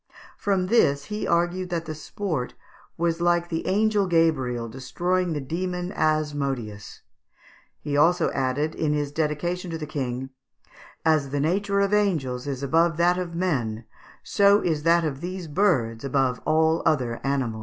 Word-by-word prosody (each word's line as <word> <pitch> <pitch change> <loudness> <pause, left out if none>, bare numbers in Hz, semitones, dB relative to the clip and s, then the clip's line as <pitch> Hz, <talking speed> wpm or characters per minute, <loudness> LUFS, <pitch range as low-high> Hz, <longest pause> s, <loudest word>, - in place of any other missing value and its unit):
From 195 -3 0
this 145 -10 +3
he 210 - -2
argued 175 +2 0
that 170 -2 -2
the 155 - -4
sport 155 - -4 0.4
was 170 0 0
like 175 0 +2
the 165 -1 -3
angel 205 +1 +2
Gabriel 135 -9 +1
destroying 175 +9 -1
the 150 - -2
demon 180 +5 -3
Asmodeus. 140 -9 -2 0.8
He 145 -1 -3
also 165 +5 +3
added, 135 +4 -1
in 150 -2 0
his 145 -1 -1
dedication 160 +4 -2
to 165 - -3
the 155 - -5
King, 130 -3 -4 0.7
"As 155 -4 +3
the 145 +1 -2
nature 200 +6 +1
of 200 +1 +1
angels 150 -12 0
is 140 -1 -4
above 165 +4 +2
that 175 +1 +3
of 170 -2 -4
men, 120 -11 -1 0.4
so 200 0 +4
is 160 -4 0
that 170 +2 +4
of 145 -3 -3
these 180 0 -5
birds 145 - +1
above 135 -2 0
all 160 +1 +3
other 125 -6 +1
animals." 130 -5 -1
160 Hz, 155 wpm, -25 LUFS, 135-180 Hz, 0.8 s, so